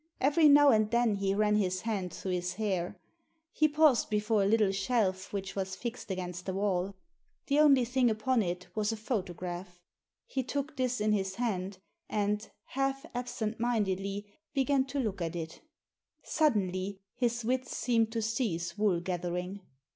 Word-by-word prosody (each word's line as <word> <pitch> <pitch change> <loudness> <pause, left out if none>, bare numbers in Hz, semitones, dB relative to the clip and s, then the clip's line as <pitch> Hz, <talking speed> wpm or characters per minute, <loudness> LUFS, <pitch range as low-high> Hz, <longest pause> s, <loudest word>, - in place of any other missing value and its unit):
Every 295 +3 +5
now 290 0 +8
and 215 -3 +4
then 235 -3 +2
he 195 0 0
ran 210 0 +3
his 185 -3 0
hand 195 -5 -2
through 190 - -5
his 180 0 -1
hair. 190 -5 -2 0.5
He 310 - +3
paused 300 -4 +4
before 210 0 +1
a 195 - +3
little 210 -2 +3
shelf 195 -2 0
which 195 -1 -4
was 190 -1 -2
fixed 235 +1 -6
against 180 -1 -4
the 190 - -2
wall. 195 -1 0 0.5
The 285 +1 +2
only 275 -5 +6
thing 250 0 +2
upon 225 +3 +1
it 180 -1 -3
was 215 +1 0
a 225 - -3
photograph. 180 -5 -4 0.5
He 265 - -2
took 285 +4 -3
this 255 -3 0
in 215 0 +2
his 190 -2 0
hand, 195 -5 -2 0.3
and, 210 0 -1 0.2
half 270 +2 -1
absent 240 -3 -3
mindedly, 200 -4 -1 0.3
began 270 0 +2
to 275 +1 -3
look 210 -7 -2
at 165 0 -2
it 160 -1 -6 0.6
Suddenly 195 - 0
his 235 -2 -1
wits 255 +1 -1
seemed 230 -2 +2
to 225 -2 -1
cease 200 -7 -2
wool 195 -5 +2
gathering. 180 +2 -3
210 Hz, 160 wpm, -31 LUFS, 190-245 Hz, 0.6 s, now